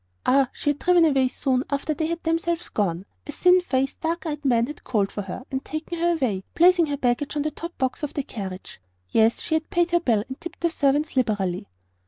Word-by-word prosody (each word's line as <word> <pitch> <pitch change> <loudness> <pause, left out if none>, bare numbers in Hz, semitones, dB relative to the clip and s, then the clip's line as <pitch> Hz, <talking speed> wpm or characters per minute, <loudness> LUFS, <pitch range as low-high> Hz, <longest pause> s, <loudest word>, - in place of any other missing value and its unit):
Ah, 270 -1 +4
she 290 - 0
had 290 - -6
driven 350 -2 +5
away 270 -4 +3
soon 255 0 0
after 280 +2 -1
they 315 +1 -1
had 335 +1 -3
themselves 330 +1 -1
gone. 185 -3 -1 0.2
A - - -4
thin 360 +4 +4
faced, 270 -5 -1
dark 330 0 -2
eyed 300 -2 -4
man 235 -4 +3
had 295 +4 -9
called 205 -5 0
for 205 - -4
her 195 +5 -7
and 265 0 -2
taken 315 +2 -5
her 345 +1 +3
away, 235 - -1
placing 345 -1 +5
her 285 -1 -2
baggage 260 +3 0
on 295 - 0
the 305 -1 -2 0.2
box 260 -1 -1
of 295 - -4
the 285 - -1
carriage. 190 - -7 0.3
Yes, 225 +1 +3
she 320 - -3
had 315 0 0
paid 345 0 +1
her 345 - +4
bill 230 -10 +1
and 260 +4 -8
tipped 345 0 -8
the 340 -1 +1
servants 290 0 +1
liberally. 205 -8 0
285 Hz, 225 wpm, -24 LUFS, 245-330 Hz, 0.3 s, driven